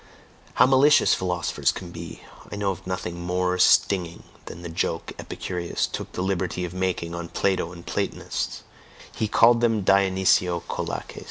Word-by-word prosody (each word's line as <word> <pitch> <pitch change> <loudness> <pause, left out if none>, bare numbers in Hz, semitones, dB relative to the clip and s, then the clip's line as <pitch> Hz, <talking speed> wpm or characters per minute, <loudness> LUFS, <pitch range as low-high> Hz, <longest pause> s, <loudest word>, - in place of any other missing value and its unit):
How - - +6
malicious 135 +3 +5
philosophers 90 -3 0
can 90 -2 -8
be! 85 -1 -9 0.3
I - - -4
know 100 -1 0
of 95 0 -9
nothing 90 -2 -4
more 90 +1 -1
stinging 90 -2 +3 0.2
than 85 - -9
the - - -5
joke 80 0 -2
Epicurus 90 -2 -3
took - - -6
the 90 - -2
liberty 95 -1 -1
of 90 - -7
making 90 -2 -2
on 85 -1 -5
Plato 95 -3 0
and 85 -1 -11
the - - -7
Platonists; - - -3 0.5
he 110 - -1
called 115 +2 +5
them 115 -3 +2
Dionysiokolakes. 95 -3 +1
90 Hz, 155 wpm, -24 LUFS, 85-100 Hz, 0.5 s, How